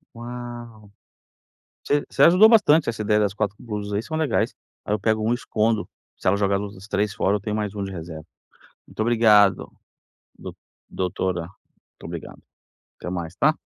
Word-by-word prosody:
Uau! 120 Hz, -3 st, -9 dB, 0.9 s
Você 145 Hz, 0 st, 0 dB
você -, -, +1 dB
ajudou 185 Hz, +6 st, +7 dB
bastante, 165 Hz, -, +5 dB
essa 115 Hz, -2 st, -2 dB
ideia 105 Hz, 0 st, +2 dB
das 100 Hz, -2 st, +1 dB
4 105 Hz, -1 st, -2 dB
blusas 105 Hz, -3 st, -5 dB
aí 100 Hz, -, -1 dB
são 155 Hz, +5 st, -5 dB
legais, 160 Hz, -3 st, 0 dB, 0.3 s
aí 105 Hz, -, -3 dB
eu 105 Hz, -, +1 dB
pego 110 Hz, 0 st, +1 dB
1 115 Hz, +2 st, +1 dB
e -, -, +3 dB
escondo. 110 Hz, -2 st, -1 dB, 0.3 s
Se -, -, -10 dB
ela 100 Hz, -, +3 dB
jogar 100 Hz, -1 st, +1 dB
a -, -, 0 dB
luz 100 Hz, 0 st, -6 dB
as 95 Hz, +2 st, -13 dB
3 100 Hz, -1 st, -1 dB
fora, 100 Hz, +2 st, +1 dB
tenho 105 Hz, -1 st, -4 dB
mais 105 Hz, -1 st, -3 dB
1 100 Hz, -1 st, -3 dB
de 95 Hz, -, -6 dB
reserva. 80 Hz, -3 st, -8 dB, 0.6 s
Muito -, -, -19 dB
obrigado, 110 Hz, -4 st, +4 dB, 0.7 s
do -, -, -8 dB, 0.3 s
doutora. 90 Hz, -1 st, -2 dB
Muito 90 Hz, +4 st, -18 dB
obrigado. -, -, -8 dB, 0.6 s
Até -, -, -6 dB
mais, 85 Hz, -1 st, -5 dB
tá? 155 Hz, +2 st, +3 dB
105 Hz, 180 wpm, -23 LUFS, 100-120 Hz, 0.9 s, ajudou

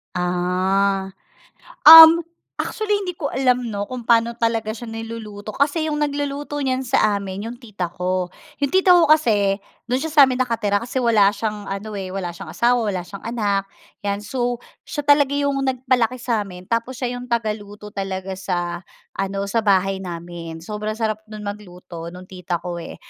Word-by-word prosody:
Ah, 185 Hz, +2 st, 0 dB, 0.8 s
um, 325 Hz, +1 st, +11 dB, 0.3 s
actually 420 Hz, -1 st, -1 dB
hindi 360 Hz, -, -3 dB
ko 305 Hz, -4 st, -4 dB
alam 250 Hz, -2 st, +1 dB
'no 205 Hz, -1 st, -3 dB
kung 245 Hz, 0 st, -8 dB
paano 230 Hz, 0 st, +4 dB
talaga 230 Hz, -2 st, -1 dB
siya 235 Hz, +1 st, -8 dB
niluluto 225 Hz, -2 st, -7 dB
kasi 300 Hz, +3 st, +1 dB
'yong 300 Hz, -1 st, -2 dB
nagluluto 290 Hz, 0 st, -2 dB
niyan 260 Hz, 0 st, 0 dB
sa 210 Hz, -5 st, +2 dB
amin 195 Hz, +1 st, -6 dB
'yong 240 Hz, +1 st, -7 dB
tita 190 Hz, -7 st, -5 dB
ko. 180 Hz, 0 st, -2 dB, 0.2 s
Yung 280 Hz, +1 st, -2 dB
tita 375 Hz, -1 st, +6 dB
ko 340 Hz, -, +5 dB
kasi, 205 Hz, -9 st, +2 dB, 0.2 s
do'n 250 Hz, +2 st, -1 dB
siya 320 Hz, -, -3 dB
sa 300 Hz, -1 st, +4 dB
amin 255 Hz, -1 st, -1 dB
nakatira 220 Hz, -5 st, 0 dB
kasi 245 Hz, +2 st, -8 dB
wala 210 Hz, -4 st, +5 dB
siyang 210 Hz, -2 st, -4 dB
ano, 200 Hz, +2 st, -5 dB
eh, 195 Hz, -2 st, -5 dB
wala 185 Hz, -2 st, -4 dB
siyang 190 Hz, +3 st, -10 dB
asawa, 240 Hz, +1 st, +2 dB
wala 180 Hz, -3 st, -2 dB
siyang 200 Hz, +1 st, -11 dB
anak, 200 Hz, -4 st, -1 dB, 0.3 s
'yan 200 Hz, 0 st, -3 dB
so, 245 Hz, +1 st, -1 dB, 0.3 s
siya 295 Hz, -2 st, -4 dB
talaga 285 Hz, -1 st, +4 dB
'yong 280 Hz, -1 st, 0 dB
nag-palaki 255 Hz, -1 st, +1 dB
sa 235 Hz, -3 st, -1 dB
amin 185 Hz, -3 st, -8 dB
tapos 230 Hz, +4 st, -2 dB
siya 250 Hz, -1 st, -3 dB
'yong 245 Hz, 0 st, -7 dB
tagaluto 210 Hz, -2 st, -3 dB
talaga 190 Hz, -1 st, -4 dB
sa 175 Hz, -2 st, -3 dB, 0.4 s
ano, 195 Hz, 0 st, -2 dB
sa 225 Hz, +3 st, 0 dB
bahay 195 Hz, -2 st, +2 dB
namin, 170 Hz, -2 st, -7 dB
sobrang 215 Hz, +1 st, -4 dB
sarap 215 Hz, -1 st, -1 dB
no'n 215 Hz, -1 st, -8 dB
mag-luto 180 Hz, -4 st, -8 dB
nung 180 Hz, +1 st, -10 dB
tita 180 Hz, -1 st, -4 dB
ko, 175 Hz, 0 st, -6 dB
eh, 165 Hz, -, -8 dB
215 Hz, 175 wpm, -21 LUFS, 195-250 Hz, 0.8 s, um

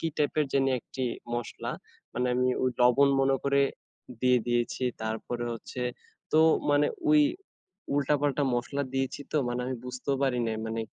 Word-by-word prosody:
কী 165 Hz, -, 0 dB
টাইপের 150 Hz, 0 st, +1 dB
জানি 135 Hz, -1 st, +3 dB
একটি 130 Hz, -, -5 dB, 0.3 s
মসলা। 120 Hz, -1 st, -4 dB, 0.4 s
মানে 125 Hz, +1 st, 0 dB
আমি 125 Hz, +1 st, +2 dB
ওই 130 Hz, -, +2 dB
লবণ 125 Hz, +3 st, +6 dB
মনে 135 Hz, 0 st, +3 dB
করে 140 Hz, 0 st, +3 dB, 0.6 s
দিয়ে 125 Hz, -1 st, +4 dB
দিয়েছি। 120 Hz, +1 st, 0 dB, 0.2 s
তারপরে 115 Hz, +2 st, -3 dB
হচ্ছে 120 Hz, +2 st, -6 dB, 0.5 s
তো 155 Hz, -, +6 dB, 0.3 s
মানে 145 Hz, 0 st, +4 dB, 0.2 s
ওই 305 Hz, 0 st, +7 dB, 0.7 s
উল্টা-পাল্টা 145 Hz, 0 st, +1 dB
মসলা 125 Hz, +4 st, -1 dB
দিয়েছি 135 Hz, +1 st, -1 dB
তো -, -, +1 dB
মানে 120 Hz, +1 st, -2 dB
আমি 130 Hz, -, -2 dB
বুঝতেও 130 Hz, +2 st, -2 dB
পারিনি। 125 Hz, -4 st, +1 dB
মানে 115 Hz, 0 st, -2 dB
130 Hz, 150 wpm, -28 LUFS, 120-140 Hz, 0.7 s, ওই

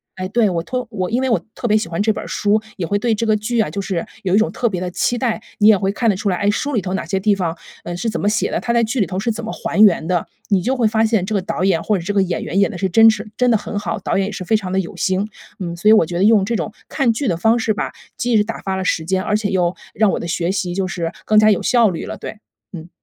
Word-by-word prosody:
哎， 185 Hz, 0 st, -4 dB
对， 220 Hz, 0 st, +2 dB
我 170 Hz, -2 st, -2 dB
托 250 Hz, +5 st, -4 dB
我 185 Hz, -4 st, -3 dB
因 250 Hz, +3 st, +1 dB
为 265 Hz, -, 0 dB
我 230 Hz, -, +2 dB
特 240 Hz, -, -4 dB
别 215 Hz, 0 st, +4 dB
喜 210 Hz, -, -2 dB
欢 165 Hz, +4 st, -2 dB
这 220 Hz, +1 st, +3 dB
本 -, -, -5 dB
儿 -, -, -9 dB
书， 210 Hz, +1 st, +1 dB, 0.2 s
也 170 Hz, -3 st, -3 dB
会 205 Hz, -, +1 dB
对 230 Hz, +2 st, +1 dB
这 220 Hz, +1 st, -1 dB
个 215 Hz, -, +4 dB
剧 220 Hz, +3 st, -1 dB
啊， 210 Hz, -, +2 dB
就 170 Hz, -, -5 dB
是 190 Hz, -4 st, -2 dB, 0.2 s
有 185 Hz, -1 st, 0 dB
一 -, -, +5 dB
种 220 Hz, -, +1 dB
特 240 Hz, -, -1 dB
别 185 Hz, -4 st, -3 dB
的 180 Hz, -, -2 dB
期 240 Hz, +6 st, 0 dB
待。 235 Hz, -3 st, -1 dB, 0.2 s
你 210 Hz, -, +5 dB
也 215 Hz, -2 st, +7 dB
会 195 Hz, +1 st, 0 dB
看 225 Hz, +3 st, 0 dB
得 200 Hz, -, +2 dB
出 205 Hz, +2 st, -4 dB
来， 185 Hz, -, +2 dB
哎， 205 Hz, -, +1 dB
书 285 Hz, +7 st, -1 dB
里 215 Hz, -, +1 dB
头 185 Hz, +2 st, -3 dB
哪 -, -, -3 dB
些 195 Hz, -, -1 dB
地 205 Hz, +1 st, +2 dB
方， 175 Hz, -3 st, -2 dB, 0.3 s
呃， 175 Hz, -, -5 dB
是 225 Hz, +6 st, -2 dB
怎 -, -, -3 dB
么 205 Hz, -, 0 dB
写 210 Hz, -, +1 dB
的， -, -, -1 dB
它 235 Hz, -, -1 dB
在 235 Hz, -1 st, +3 dB
剧 230 Hz, +3 st, -1 dB
里 200 Hz, -, +3 dB
头 185 Hz, 0 st, -4 dB
是 230 Hz, +3 st, 0 dB
怎 225 Hz, +1 st, -5 dB
么 -, -, -4 dB
还 -, -, -3 dB
原 170 Hz, -6 st, +4 dB
的。 175 Hz, -1 st, 0 dB, 0.2 s
你 195 Hz, -2 st, +3 dB
就 260 Hz, +4 st, 0 dB
会 235 Hz, -4 st, +2 dB
发 220 Hz, +1 st, +2 dB
现 220 Hz, -4 st, +1 dB
这 210 Hz, +3 st, -2 dB
个 200 Hz, -, +1 dB
导 185 Hz, -, -3 dB
演 175 Hz, -4 st, +2 dB
或 210 Hz, -4 st, +1 dB
者 -, -, -7 dB
这 205 Hz, +3 st, -3 dB
个 195 Hz, -, +4 dB
演 180 Hz, -2 st, -3 dB
员 195 Hz, -, -1 dB
演 200 Hz, -, +3 dB
得 180 Hz, -, -7 dB
是 190 Hz, -1 st, 0 dB
真 225 Hz, +4 st, +7 dB
是 220 Hz, -, -6 dB
真 250 Hz, -1 st, +3 dB
的 225 Hz, -, +4 dB
很 205 Hz, 0 st, -6 dB
好， 205 Hz, -, -3 dB
导 -, -, -1 dB
演 195 Hz, -, +1 dB
也 -, -, -5 dB
是 190 Hz, -2 st, -6 dB
非 220 Hz, +5 st, +2 dB
常 190 Hz, -3 st, -6 dB
地 190 Hz, -, +1 dB
有 180 Hz, -, -5 dB
心。 190 Hz, +3 st, 0 dB, 0.3 s
嗯， 170 Hz, -2 st, -4 dB
所 175 Hz, +5 st, -2 dB
以 -, -, +8 dB
我 215 Hz, -, +6 dB
觉 175 Hz, +1 st, -4 dB
得 190 Hz, -, +1 dB
用 210 Hz, -2 st, +5 dB
这 230 Hz, +2 st, -1 dB
种 215 Hz, -, -3 dB, 0.2 s
看 255 Hz, -6 st, +1 dB
剧 260 Hz, +3 st, -2 dB
的 170 Hz, -3 st, 0 dB
方 225 Hz, +6 st, +3 dB
式 220 Hz, -1 st, +1 dB
吧， -, -, -3 dB, 0.3 s
既 245 Hz, -1 st, 0 dB
是 210 Hz, -, +4 dB
打 225 Hz, +1 st, -5 dB
发 190 Hz, -1 st, -2 dB
了 190 Hz, -, -2 dB
时 160 Hz, -3 st, 0 dB
间， 190 Hz, +1 st, 0 dB
而 210 Hz, +1 st, 0 dB
且 210 Hz, -2 st, -2 dB
又 180 Hz, -2 st, +1 dB, 0.2 s
让 215 Hz, -1 st, +3 dB
我 -, -, -2 dB
的 -, -, -5 dB
学 170 Hz, +2 st, -1 dB
习 180 Hz, -3 st, -2 dB
就 190 Hz, 0 st, -1 dB
是 170 Hz, -2 st, -3 dB
更 215 Hz, -, +3 dB
加 215 Hz, 0 st, +6 dB
有 195 Hz, -, +1 dB
效 235 Hz, -5 st, +3 dB
率 165 Hz, -, -5 dB
了， -, -, -6 dB
对， 210 Hz, -, -8 dB, 0.4 s
嗯。 170 Hz, 0 st, -9 dB
205 Hz, 360 characters per minute, -19 LUFS, 185-220 Hz, 0.4 s, 以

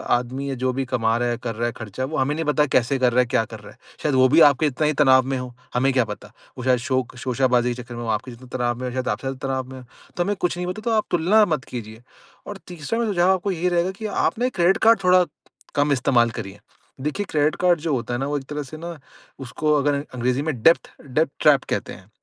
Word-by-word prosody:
आदमी 130 Hz, +3 st, -3 dB
या 135 Hz, -, -2 dB
जो 130 Hz, -, +2 dB
भी 135 Hz, +1 st, -1 dB
कमा 115 Hz, -3 st, 0 dB
रहा 120 Hz, 0 st, 0 dB
है, 120 Hz, -, -1 dB
कर 115 Hz, -2 st, -5 dB
रहा 115 Hz, +2 st, -2 dB
है, -, -, -2 dB
खर्चा 110 Hz, +3 st, -5 dB
वो 155 Hz, +4 st, -4 dB
हमें 135 Hz, +2 st, +1 dB
नहीं 165 Hz, +1 st, -2 dB
पता 150 Hz, 0 st, +2 dB
कैसे 130 Hz, +2 st, +2 dB
कर 125 Hz, -1 st, +3 dB
रहा 125 Hz, -, +3 dB
है, -, -, +1 dB
क्या 115 Hz, -, +1 dB
कर 110 Hz, 0 st, -10 dB
रहा 105 Hz, -, -13 dB
है। -, -, -20 dB, 0.3 s
शायद 150 Hz, -3 st, +1 dB
वो 130 Hz, 0 st, +6 dB
भी 155 Hz, +5 st, +5 dB
आपके 140 Hz, +2 st, 0 dB
जितना 150 Hz, +3 st, -1 dB
ही 155 Hz, -, +1 dB
तनाव 130 Hz, -2 st, +6 dB
में 135 Hz, 0 st, -1 dB
हो, 125 Hz, -1 st, -6 dB, 0.2 s
हमें 130 Hz, +2 st, +2 dB
क्या 130 Hz, -2 st, +3 dB
पता? 105 Hz, -1 st, -9 dB, 0.3 s
वो 125 Hz, -, -6 dB
शायद 130 Hz, -1 st, +3 dB
शौक 130 Hz, 0 st, -2 dB
शोशाबाजी 125 Hz, -1 st, +1 dB
के 125 Hz, -, -7 dB
चक्कर 120 Hz, 0 st, -10 dB
में 120 Hz, -, -6 dB
हो, -, -, -5 dB
आपके 130 Hz, +4 st, -11 dB
जितने 125 Hz, +2 st, -13 dB
तनाव 120 Hz, -1 st, 0 dB
में 130 Hz, -, -4 dB
हो, -, -, -4 dB
शायद 130 Hz, 0 st, -3 dB
आपसे 135 Hz, -, -2 dB
ज़्यादा 135 Hz, 0 st, -4 dB
तनाव 130 Hz, -1 st, -3 dB
में 130 Hz, -, -8 dB
हो। -, -, -12 dB, 0.3 s
तो 175 Hz, -, +2 dB
हमें 205 Hz, +3 st, -1 dB
कुछ 180 Hz, -2 st, -2 dB
नहीं 180 Hz, 0 st, -3 dB
पता 185 Hz, +4 st, -4 dB
तो 230 Hz, +1 st, -1 dB
आप 215 Hz, -, +1 dB
तुलना 190 Hz, +6 st, +4 dB
मत 140 Hz, -4 st, -3 dB
कीजिए। 110 Hz, -2 st, -8 dB, 0.5 s
और -, -, -6 dB
तीसरा 175 Hz, +6 st, -4 dB
मेरा 230 Hz, -3 st, 0 dB
सुझाव 180 Hz, 0 st, +3 dB
आपको 190 Hz, +1 st, 0 dB
यही 180 Hz, 0 st, 0 dB
रहेगा 175 Hz, +1 st, +1 dB
कि 200 Hz, +3 st, -9 dB
आप 210 Hz, +1 st, 0 dB
ना 245 Hz, -, +1 dB
ये 255 Hz, -, +2 dB
क्रेडिट 180 Hz, -1 st, +3 dB
कार्ड 225 Hz, -1 st, +6 dB
थोड़ा 180 Hz, 0 st, +5 dB, 0.5 s
कम 145 Hz, 0 st, +2 dB
इस्तेमाल 125 Hz, -3 st, +3 dB
करिए। 100 Hz, -2 st, -7 dB, 0.4 s
देखिए 150 Hz, +9 st, -2 dB
क्रेडिट 150 Hz, 0 st, +1 dB
कार्ड 175 Hz, -2 st, +3 dB
जो 155 Hz, 0 st, -2 dB
होता 120 Hz, -1 st, -2 dB
है 120 Hz, -, -2 dB
ना, 135 Hz, -, -1 dB
वो 145 Hz, 0 st, -1 dB
एक 135 Hz, -, -6 dB
तरह 150 Hz, 0 st, -3 dB
से 145 Hz, +3 st, -10 dB
ना 170 Hz, +1 st, -7 dB, 0.4 s
उसको 140 Hz, +4 st, -1 dB
अगर 145 Hz, +1 st, +1 dB
अ -, -, -6 dB
अंग्रेज़ी 125 Hz, +2 st, 0 dB
में 145 Hz, -6 st, -3 dB
डेप्थ-डेप्थ 155 Hz, -3 st, +2 dB
ट्रैप 140 Hz, -3 st, +5 dB
कहते -, -, -2 dB
हैं। 95 Hz, +1 st, -15 dB
135 Hz, 275 wpm, -22 LUFS, 125-165 Hz, 0.5 s, वो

